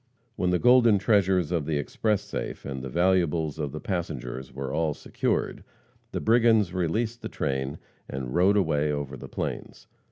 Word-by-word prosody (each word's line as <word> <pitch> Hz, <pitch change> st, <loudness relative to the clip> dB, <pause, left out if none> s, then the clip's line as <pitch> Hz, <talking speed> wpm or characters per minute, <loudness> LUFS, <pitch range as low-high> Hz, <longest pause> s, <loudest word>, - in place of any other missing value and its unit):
When 90 Hz, -, 0 dB
the 90 Hz, -, +3 dB
golden 120 Hz, -1 st, +6 dB
treasures 95 Hz, -5 st, +2 dB
of 80 Hz, -5 st, -1 dB
the 80 Hz, -2 st, 0 dB
express 105 Hz, +8 st, 0 dB
safe, 105 Hz, -, -5 dB
and 65 Hz, -1 st, -4 dB
the 65 Hz, -, -5 dB
valuables 85 Hz, -2 st, +1 dB
of 75 Hz, -2 st, -2 dB
the 75 Hz, -, -6 dB
passengers 65 Hz, -9 st, -4 dB
were 65 Hz, +1 st, -5 dB
all 80 Hz, -1 st, 0 dB
secured, -, -, -2 dB, 0.5 s
the -, -, -2 dB
brigands 110 Hz, -5 st, +4 dB
released 110 Hz, +7 st, -1 dB
the -, -, -5 dB
train 65 Hz, +1 st, -2 dB, 0.3 s
and 65 Hz, -1 st, -4 dB
rode 95 Hz, +4 st, +4 dB
away 75 Hz, -5 st, +2 dB
over 70 Hz, -2 st, -3 dB
the -, -, -10 dB
plains. -, -, -5 dB
85 Hz, 165 wpm, -27 LUFS, 70-100 Hz, 0.5 s, golden